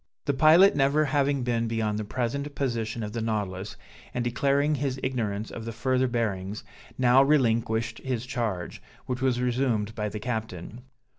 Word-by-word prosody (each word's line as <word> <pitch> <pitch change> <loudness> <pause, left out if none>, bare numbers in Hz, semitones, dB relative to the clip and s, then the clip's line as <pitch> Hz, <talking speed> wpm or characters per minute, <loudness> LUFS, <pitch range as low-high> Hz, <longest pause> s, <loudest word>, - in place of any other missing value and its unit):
The 140 - +1
pilot 160 +7 +6
never 145 +2 +3
having 140 -1 +1
been 115 -1 0
beyond 110 -2 -1
the - - -2
present 130 +6 -3
position 115 -4 -2
of 105 0 -5
the 115 - -2
Nautilus, 105 -3 -3 0.4
and 125 - 0
declaring 140 +4 +1
his 135 -2 -2
ignorance 110 -5 -2
of 115 - -7
the 115 - -5
further 130 +3 +1
bearings, 105 -4 -2 0.3
now 125 +1 +5
relinquished 115 -5 +2
his 125 -3 -3
charge, 115 -9 -3 0.2
which 125 0 -3
was 130 -2 +1
resumed 120 -4 0
by 105 -2 -2
the 105 - -6
captain. 110 -2 -5
120 Hz, 160 wpm, -27 LUFS, 110-135 Hz, 0.4 s, pilot